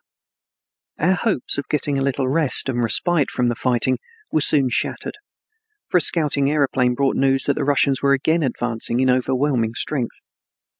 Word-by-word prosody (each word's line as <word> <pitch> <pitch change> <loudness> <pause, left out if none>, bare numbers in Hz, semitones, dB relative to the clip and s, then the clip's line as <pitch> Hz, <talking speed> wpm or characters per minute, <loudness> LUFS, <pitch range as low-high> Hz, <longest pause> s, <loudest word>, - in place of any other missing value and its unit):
III 170 - +1
Our - - +4
hopes 185 - 0
of 140 - -7
getting 145 -2 -1
a - - -2
little 135 -1 -1
rest 140 -1 +1
and 120 -2 -1
respite 150 +7 +2
from 125 -1 -1
the 120 - -2
fighting 125 +1 0 0.3
were 155 - +1
soon 140 -3 +3
shattered, 120 - -2 0.7
for 180 - +2
a - - 0
scouting 145 -5 +2
aeroplane 135 -4 +1
brought 135 +1 0
news 135 -1 +1
that 140 - +1
the - - -3
Russians 140 -1 +1
were 140 0 +3
again 160 +5 +1
advancing 120 -3 -2
in 130 0 +3
overwhelming 130 -2 0
strength. 130 -2 -3
135 Hz, 170 wpm, -20 LUFS, 125-145 Hz, 0.7 s, Our